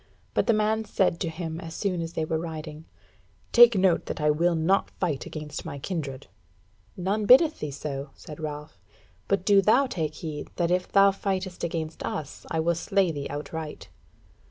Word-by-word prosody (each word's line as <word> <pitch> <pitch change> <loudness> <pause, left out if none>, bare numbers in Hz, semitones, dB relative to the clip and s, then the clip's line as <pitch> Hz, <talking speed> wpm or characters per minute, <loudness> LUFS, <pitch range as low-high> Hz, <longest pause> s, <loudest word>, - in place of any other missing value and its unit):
But - - +1
the 230 - +5
man 215 +1 +1
said 190 -5 +1
to 170 - -1
him, 160 0 -5
as 165 0 -8
soon 185 -4 -1
as 165 0 -5
they 160 - -1
were 160 0 -1
riding: 160 -1 -7 0.7
"Take 235 -3 +8
note 185 -2 +2
that - - -4
I 150 0 +3
will 170 +3 +2
not 165 +5 +2
fight 160 -7 -3
against 150 -1 -6
my 140 - -6
kindred." 140 -3 -4 0.7
"None 200 +3 -1
biddeth 305 +5 +6
thee 150 - -3
so," 140 0 -5
said 150 0 -10
Ralph; 150 - -6 0.5
"but 195 -2 0
do 200 -1 +6
thou 230 +8 +4
take 160 - -3
heed 155 -3 -6
that 170 -1 0
if 180 0 0
thou 195 0 +6
fight 195 -1 -2 0.2
against 160 -2 -3
us 150 -3 -5
I 160 - -1
will 170 +2 +2
slay 185 +2 +1
thee 145 -2 -4
outright." 155 +1 -6
165 Hz, 180 wpm, -26 LUFS, 155-195 Hz, 0.7 s, Take